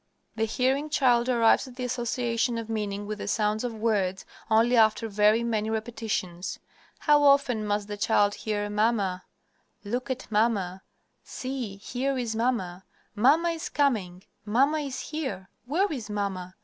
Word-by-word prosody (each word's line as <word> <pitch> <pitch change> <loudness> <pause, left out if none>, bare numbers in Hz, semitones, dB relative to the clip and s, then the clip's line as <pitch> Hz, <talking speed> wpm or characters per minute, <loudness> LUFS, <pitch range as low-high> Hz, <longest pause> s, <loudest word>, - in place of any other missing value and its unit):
The 220 0 +1
hearing 260 +6 0
child 245 -4 +3
arrives 235 +1 +4
at 250 - -12
the 255 - -5
association 240 -1 -1
of 225 -1 -5
meaning 205 -2 -3
with 210 0 -5
the - - -5
sounds 210 +1 0
of 240 -2 -3
words 205 -4 0 0.2
only 225 +3 +4
after 225 0 +4
very 210 +2 +3
many 220 -2 -1
repetitions. 215 -5 -3 0.4
How 295 -1 +4
often 275 -6 +3
must 205 0 -1
the 205 0 -5
child 205 -1 +2
hear 205 -1 -3
"Mamma," 205 -3 0 0.6
"Look 245 +6 -3
at 260 0 -3
mamma," 205 -4 +1 0.4
"See, 255 -6 -5
here 260 +6 -2
is 235 -3 -2
mamma," 215 -7 -1 0.3
"Mamma 290 +10 +4
is 330 -1 -4
coming," 205 -11 0 0.2
"Mamma 270 +9 +2
is 275 -3 -4
here," 270 -11 -5 0.2
"Where 360 +8 +1
is 230 -7 -6
mamma?" 190 -3 -3
225 Hz, 150 wpm, -27 LUFS, 205-255 Hz, 0.6 s, arrives